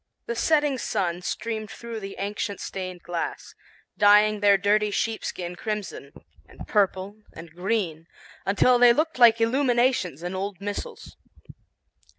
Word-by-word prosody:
The 235 - -3
setting 295 0 +1
sun 175 -4 -2
streamed 215 +3 -4
through 235 -1 -7
the 195 -1 -8
ancient 200 0 -4
stained 185 -2 -6
glass, 175 -1 -5 0.4
dyeing 210 0 +5
their 200 -1 +5
dirty 210 +2 +2
sheepskin 200 -5 -3
crimson, 210 +1 -5 0.4
and - - -12
purple, 200 -1 0 0.2
and 165 0 -11
green, 180 -4 -2 0.4
until 240 +6 +3
they 240 -1 +7
looked 310 +1 -1
like 230 -2 +7
illuminations 240 - +1
in 175 +1 -4
old 190 0 -4
missals. 205 - -7
205 Hz, 130 wpm, -25 LUFS, 185-230 Hz, 0.4 s, they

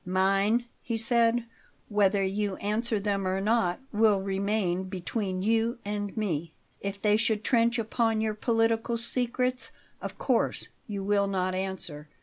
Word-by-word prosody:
"Mine," 195 +5 +2 0.2
he 230 -1 -2
said, 235 +1 +2 0.4
"whether 200 -1 +3
you 195 +1 -1
answer 215 +2 0
them 200 -1 -1
or 190 +1 0
not, 200 -3 +1
will 210 -2 +4
remain 195 -1 0
between 185 0 -3
you 225 +3 +2
and 205 0 -3
me. 170 -7 -2 0.2
If 200 0 -4
they 210 +1 +3
should 220 -1 +1
trench 235 0 +3
upon 225 0 +1
your 220 0 0
political 225 +1 +1
secrets, 250 +2 0 0.3
of - - -6
course - - 0 0.2
you 200 -3 -4
will 200 0 +2
not 185 -1 0
answer. 185 -6 -4
210 Hz, 140 wpm, -28 LUFS, 195-225 Hz, 0.4 s, will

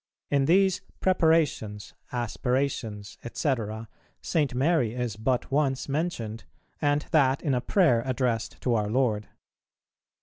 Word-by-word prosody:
In 140 -1 +3
these 190 +4 +3 0.2
"Preparations," 160 - +1 0.2
"Aspirations," 120 -3 -2
&c., 145 - +1 0.7
St. 145 -6 0
Mary 130 -4 +2
is 125 -4 -2
but 125 +4 -1
once 135 -2 +1
mentioned, 135 -8 -3 0.4
and 145 0 +1
that 140 -4 +3
in 145 -5 +1
a 125 - +1
prayer 145 - +3
addressed 125 -3 -1
to 125 - +1
our 105 -2 +1
Lord. 110 -3 +1
130 Hz, 115 wpm, -27 LUFS, 115-150 Hz, 0.7 s, In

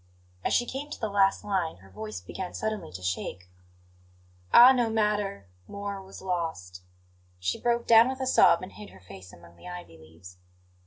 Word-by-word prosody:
As - - 0
she 240 - +2
came 270 +4 -6
to - - -7
the 220 -2 -3
last 195 -1 +2
line, 185 - -1
her 95 +1 -18
voice 105 -1 -7
began 180 - -7
suddenly 215 - -4
to 90 0 -8
shake. 90 0 -4 1.0
"Ah, 245 +2 +9
no 245 -3 +1
matter! 210 - -1 0.2
More 200 -1 -6
was 190 0 -12
lost 160 - -4 0.3
" 90 0 -35
She 90 0 -2
broke 235 0 0
down 230 +2 +7
with 265 0 -5
a 260 - -2
sob 255 - +5
and 185 - -8
hid 210 -1 -11
her - - -16
face 95 0 -13
among 85 0 -17
the - - -13
ivy 175 - -9
leaves. 85 +3 -15
180 Hz, 190 wpm, -27 LUFS, -, 1.0 s, Ah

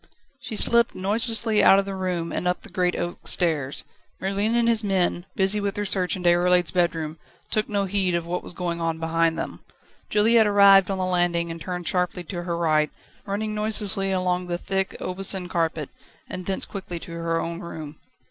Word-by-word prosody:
She 250 -4 -6
slipped 235 +2 +6
noiselessly 220 +2 +2
out 195 - +7
of 195 - +1
the 195 - -5
room 180 -3 -3
and 180 - -2
up 180 - -1
the - - -12
great 180 -1 0
oak 175 0 -5
stairs. 150 -6 0 0.4
Merlin 200 +4 -1
and 235 -1 +2
his 230 -1 +5
men, 185 -2 0
busy 195 +2 +1
with 200 -1 -2
their 205 - -2
search 185 -2 +1
in 185 - -7
Déroulède's 175 0 +3
bedroom, 165 -3 -1 0.3
took 215 -2 -1
no 200 -1 0
heed 190 -2 0
of 170 -1 -2
what 175 +1 -3
was - - -8
going 170 -2 -3
on 165 -1 -1
behind 165 0 0
them; - - -6 0.5
Juliette 220 +1 +4
arrived 200 -2 +6
on 195 - -2
the 185 - -1
landing, 175 -2 0
and 165 0 -8
turned 180 0 -5
sharply 180 -1 -1
to 175 +1 -6
her 170 -1 -3
right, 155 -2 +1 0.4
running 215 +2 -3
noiselessly 210 -2 0
along 180 -1 -1
the 175 -1 -2
thick 195 +1 -2
Aubusson 185 0 -1
carpet, 165 -4 -2 0.4
and 185 -1 -7
thence 195 - 0
quickly 190 -3 -7
to 170 - -10
her 165 0 -2
own 170 +1 -4
room. 155 -4 -9
180 Hz, 195 wpm, -24 LUFS, 170-200 Hz, 0.5 s, out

